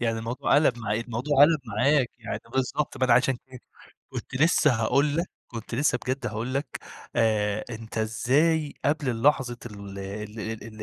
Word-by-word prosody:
يعني 115 Hz, -2 st, 0 dB
الموضوع 115 Hz, +5 st, 0 dB
قَلَب 145 Hz, -5 st, +4 dB
معاك، 110 Hz, 0 st, -2 dB
الموضوع 125 Hz, +5 st, -2 dB
قَلَب 155 Hz, +1 st, +6 dB
معاك، 125 Hz, +5 st, +2 dB
يع 115 Hz, -, -4 dB
بالضبط. 130 Hz, +3 st, -1 dB
ما 130 Hz, -, +2 dB
أنا 125 Hz, -, +4 dB
عشان 130 Hz, +2 st, +4 dB
كده 130 Hz, -2 st, -12 dB, 0.5 s
كنت -, -, -7 dB
لسه 150 Hz, 0 st, +4 dB
هاقول 140 Hz, +6 st, +2 dB
لك، 170 Hz, +2 st, 0 dB, 0.2 s
كنت 115 Hz, 0 st, -7 dB
لسه 125 Hz, -1 st, +2 dB
بجد 130 Hz, +2 st, -2 dB
هاقول 115 Hz, +4 st, -3 dB
لك 140 Hz, +2 st, 0 dB, 0.5 s
آآ 105 Hz, -2 st, +1 dB
أنت 110 Hz, -1 st, -6 dB
إزاي 145 Hz, +8 st, +1 dB
قبل 145 Hz, -1 st, +1 dB
اللحظة 125 Hz, 0 st, +2 dB
ال 100 Hz, -3 st, -9 dB
ال 105 Hz, +3 st, -6 dB
ال 110 Hz, 0 st, -6 dB
120 Hz, 165 wpm, -26 LUFS, 110-140 Hz, 0.5 s, قَلَب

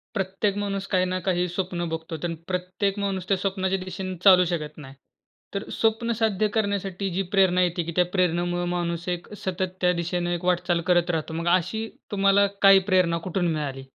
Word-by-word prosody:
प्रत्येक 195 Hz, +1 st, -1 dB
माणूस 200 Hz, -1 st, -2 dB
काही 185 Hz, -2 st, +2 dB
ना 185 Hz, 0 st, -1 dB
काही 180 Hz, -1 st, +2 dB
स्वप्न 175 Hz, -1 st, -3 dB
बघतो. 160 Hz, 0 st, -5 dB
तर 170 Hz, -1 st, -2 dB
प्रत्येक 185 Hz, +2 st, -2 dB
माणूस 195 Hz, -2 st, -2 dB
त्या 195 Hz, -, +3 dB
स्वप्नाच्या 190 Hz, 0 st, -1 dB
दिशेने 185 Hz, 0 st, -5 dB
चालू 185 Hz, -2 st, +8 dB
शकत 155 Hz, -4 st, -3 dB
नाही. 135 Hz, -3 st, -10 dB, 0.6 s
तर 200 Hz, -, -4 dB
स्वप्न 225 Hz, +1 st, +1 dB
साध्य 215 Hz, -2 st, +1 dB
करण्यासाठी 200 Hz, -3 st, -1 dB
जी 185 Hz, +2 st, -1 dB
प्रेरणा 185 Hz, -2 st, +4 dB
येते, 175 Hz, 0 st, 0 dB
की 170 Hz, +1 st, -5 dB
त्या 180 Hz, -, +5 dB
प्रेरणेमुळं 175 Hz, -1 st, +1 dB
माणूस 175 Hz, -1 st, -2 dB
एक 175 Hz, +2 st, -4 dB
सतत 185 Hz, 0 st, -2 dB
त्या 180 Hz, -1 st, +3 dB
दिशेनं 175 Hz, 0 st, -2 dB
एक 175 Hz, 0 st, -3 dB
वाटचाल 180 Hz, -1 st, +1 dB
करत 175 Hz, -1 st, +3 dB
राहतो. 160 Hz, -1 st, -2 dB
मग 170 Hz, +1 st, -2 dB
अशी 220 Hz, +5 st, -3 dB, 0.2 s
तुम्हाला 200 Hz, 0 st, +4 dB, 0.2 s
काही 195 Hz, -1 st, +8 dB
प्रेरणा 180 Hz, -3 st, +3 dB
कुठून 180 Hz, 0 st, 0 dB
मिळाली? 140 Hz, -4 st, -4 dB
185 Hz, 180 wpm, -25 LUFS, 175-195 Hz, 0.6 s, चालू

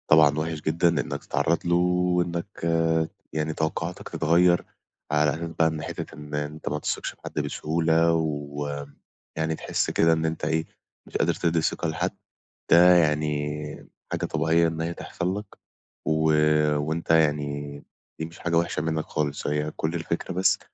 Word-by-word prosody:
طبعًا 75 Hz, -1 st, +5 dB
وحش 80 Hz, -1 st, -3 dB
جدًا 80 Hz, +3 st, +2 dB
إنك 80 Hz, -4 st, -2 dB
تتعرَّض 85 Hz, +2 st, 0 dB
له 85 Hz, 0 st, +3 dB
وإنك 90 Hz, +1 st, 0 dB, 0.7 s
يعني 80 Hz, 0 st, -1 dB
توقُّعاتك 80 Hz, 0 st, -3 dB
تتغيَّر 85 Hz, +2 st, +3 dB, 0.5 s
على 75 Hz, 0 st, +3 dB
أساس 85 Hz, +1 st, -4 dB
بقى، 80 Hz, -, +5 dB
إن 80 Hz, -1 st, -2 dB
حتة -, -, -6 dB
إن 75 Hz, 0 st, -10 dB
أنت 75 Hz, +1 st, -3 dB
ما 75 Hz, -, -2 dB
تثقش -, -, -2 dB
في -, -, -30 dB
حد -, -, -3 dB
بسهولة، 80 Hz, +1 st, +1 dB
ويعني 75 Hz, +1 st, -4 dB
تحِس -, -, -1 dB
كده 80 Hz, 0 st, +4 dB
إن 80 Hz, 0 st, 0 dB
أنت 80 Hz, -1 st, -2 dB
إيه، 80 Hz, +1 st, 0 dB, 0.4 s
مش -, -, -3 dB
قادر -, -, +2 dB
تدِّي 85 Hz, -1 st, +1 dB
ثقة 85 Hz, -, -1 dB
لحد، 85 Hz, +3 st, -1 dB, 0.6 s
ده 90 Hz, +1 st, +8 dB
يعني، 75 Hz, -2 st, 0 dB, 0.2 s
حاجة -, -, -1 dB
طبيعية 85 Hz, +1 st, +2 dB
إن 80 Hz, 0 st, -3 dB
هي 85 Hz, +1 st, -2 dB
تحصل 90 Hz, +3 st, -3 dB
لك. 105 Hz, -, -9 dB, 0.5 s
و 80 Hz, 0 st, +3 dB, 0.5 s
وأنت 80 Hz, +3 st, -3 dB
يعني 75 Hz, -2 st, +1 dB, 0.4 s
دي 80 Hz, -, -2 dB
مش 80 Hz, +1 st, -12 dB
حاجة 85 Hz, -1 st, 0 dB
وحشة 85 Hz, -2 st, 0 dB
منك 80 Hz, 0 st, -1 dB
خالص. 75 Hz, -2 st, -2 dB
هي 75 Hz, +1 st, -1 dB
كل 80 Hz, +2 st, -1 dB
الفكرة 85 Hz, +2 st, -3 dB
بس 95 Hz, +2 st, +3 dB
80 Hz, 155 wpm, -26 LUFS, 75-85 Hz, 0.7 s, ده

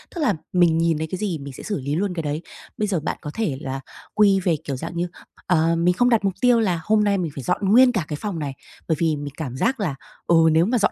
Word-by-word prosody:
Tức 340 Hz, -, -3 dB
là 290 Hz, -, +3 dB, 0.2 s
mình 175 Hz, -3 st, +4 dB
nhìn 165 Hz, -1 st, +2 dB
thấy 160 Hz, +1 st, -3 dB
cái 185 Hz, -, -2 dB
gì 185 Hz, -5 st, -2 dB
mình 140 Hz, -1 st, -8 dB
sẽ -, -, -10 dB
xử 205 Hz, -, -3 dB
lý 140 Hz, +2 st, -2 dB
luôn 190 Hz, +2 st, -1 dB
cái 165 Hz, -2 st, -3 dB
đấy. 150 Hz, +1 st, -2 dB, 0.4 s
Bây 210 Hz, -, 0 dB
giờ 185 Hz, -5 st, 0 dB
bạn 155 Hz, -, -3 dB
có 150 Hz, -, -6 dB
thể 195 Hz, -12 st, -1 dB
là 135 Hz, -2 st, -4 dB, 0.3 s
quy 200 Hz, -2 st, +4 dB
về 180 Hz, -3 st, +1 dB
kiểu 140 Hz, -, -3 dB
dạng 165 Hz, +6 st, -6 dB
như, 175 Hz, +1 st, 0 dB, 0.4 s
ờ, 165 Hz, -2 st, +3 dB
mình 175 Hz, +2 st, +2 dB
không 245 Hz, +6 st, +3 dB
đặt 230 Hz, -4 st, +3 dB
mục 195 Hz, -, +1 dB
tiêu 245 Hz, -2 st, +5 dB
là 185 Hz, -7 st, +1 dB
hôm 215 Hz, +2 st, +3 dB
nay 200 Hz, -1 st, +2 dB
mình 170 Hz, -5 st, -2 dB
phải 135 Hz, -, -6 dB
dọn 195 Hz, -, 0 dB
nguyên 250 Hz, +4 st, +7 dB
cả 195 Hz, -9 st, -1 dB
cái 150 Hz, -, -4 dB
phòng 200 Hz, -6 st, -3 dB
này, 145 Hz, -3 st, -3 dB, 0.3 s
bởi 160 Hz, -, +2 dB
vì 160 Hz, -2 st, +2 dB
mình 145 Hz, -1 st, -6 dB
cảm 130 Hz, -6 st, -5 dB
giác 250 Hz, -, 0 dB
là, 175 Hz, -10 st, -1 dB, 0.3 s
ừ, 170 Hz, -, +4 dB, 0.2 s
nếu 160 Hz, +2 st, +4 dB
mà 245 Hz, +5 st, +1 dB
dọn 205 Hz, -, +2 dB
175 Hz, 285 wpm, -22 LUFS, 155-205 Hz, 0.4 s, nguyên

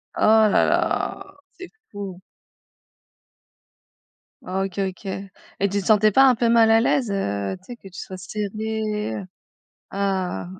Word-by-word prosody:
Oh -, -, -4 dB, 0.3 s
là -, -, +3 dB
là, -, -, 0 dB, 0.3 s
c'est 370 Hz, -1 st, -9 dB, 0.2 s
fou. 195 Hz, -3 st, -7 dB, 2.3 s
Ah 190 Hz, +1 st, -2 dB
OK 195 Hz, 0 st, -6 dB
OK 195 Hz, +1 st, -3 dB
et 195 Hz, 0 st, -5 dB, 0.4 s
tu 200 Hz, +1 st, -1 dB
te -, -, -11 dB
sentais 215 Hz, 0 st, +4 dB
pas 270 Hz, -, +6 dB
un 250 Hz, -, +3 dB
peu 235 Hz, +1 st, +1 dB
mal 230 Hz, -1 st, +5 dB
à 225 Hz, -, +6 dB
l'aise, 240 Hz, -1 st, +1 dB
heu, 100 Hz, -, -2 dB
tu 185 Hz, -, -29 dB
sais 245 Hz, -, -8 dB
que 195 Hz, -5 st, -14 dB
tu 185 Hz, -, -10 dB
sois 190 Hz, -, -7 dB
serrée 215 Hz, -, -3 dB
heu? 100 Hz, -, -6 dB, 0.7 s
Ah. 190 Hz, -3 st, -2 dB
200 Hz, 155 wpm, -23 LUFS, 190-220 Hz, 2.3 s, pas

